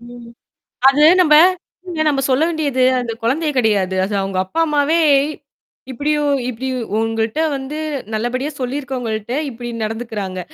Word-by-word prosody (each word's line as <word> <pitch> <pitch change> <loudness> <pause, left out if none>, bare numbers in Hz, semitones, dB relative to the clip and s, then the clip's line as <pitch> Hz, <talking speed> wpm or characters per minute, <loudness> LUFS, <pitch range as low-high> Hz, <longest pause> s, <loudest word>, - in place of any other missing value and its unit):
ம். 240 0 -12 0.6
அது 285 +2 +1 0.2
நம்ம 305 -4 +4 0.6
இல்ல 300 -3 +1
சொல்ல 260 +4 +3
வேண்டியது 285 -6 0 0.2
அந்த 235 -2 -4
குழந்தைய 300 +6 0
கிடையாது. 200 -5 +1
அது 205 - -5
அவங்க 195 -1 -3
அப்பா 325 - -4
அம்மாவே 300 +1 +1 0.9
இப்படி 285 +4 -2 0.4
இப்டி 250 +2 -5 0.3
உங்கள்ட்ட 225 +3 -1 0.2
வந்து 270 +2 -6 0.4
நல்லபடியா 255 +6 -2
சொல்லிருக்கவங்ககிட்ட 245 -4 -4 0.2
இப்டி 240 0 -7
நடந்துக்கிறாங்க. 215 -4 -4
245 Hz, 120 wpm, -18 LUFS, 225-285 Hz, 0.9 s, நம்ம